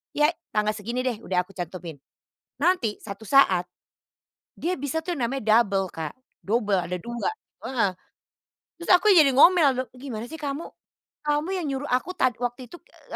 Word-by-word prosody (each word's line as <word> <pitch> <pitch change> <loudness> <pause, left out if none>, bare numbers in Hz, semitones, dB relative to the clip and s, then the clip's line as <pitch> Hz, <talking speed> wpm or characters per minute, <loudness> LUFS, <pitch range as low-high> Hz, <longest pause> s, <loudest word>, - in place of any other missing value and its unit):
"Ya 300 +2 +4 0.2
tanggal 210 0 +2
segini 230 +4 -4
deh 245 -4 -2
udah 180 -5 0
aku 180 - -18
cantumin." 175 -4 -7 0.6
Nanti 285 - +1
satu 200 +1 -9
saat, 200 -8 +4 0.9
dia 355 +1 -2
bisa 285 +4 -2
tuh 350 -1 -3
namanya 235 -3 +2
double 195 -3 -2
Kak, 160 -2 -6 0.2
double 210 -2 0
ada 180 - -3
2, 235 0 -2 0.4
heeh, 230 -7 +1 0.9
terus 340 - -8
aku 405 +4 +4
jadi 320 -6 +7
ngomel, 340 +2 +7
"Lho 255 - -1 0.2
gimana 240 -5 -6
sih 320 - -7
kamu? 290 +2 -4 0.6
Kamu 295 +3 0
yang 365 - -2
nyuruh 275 +2 -3
aku 255 +8 0
tad 255 -3 +2
waktu 245 +1 -4
itu, 240 - -12
e - - -13
250 Hz, 165 wpm, -25 LUFS, 210-295 Hz, 0.9 s, jadi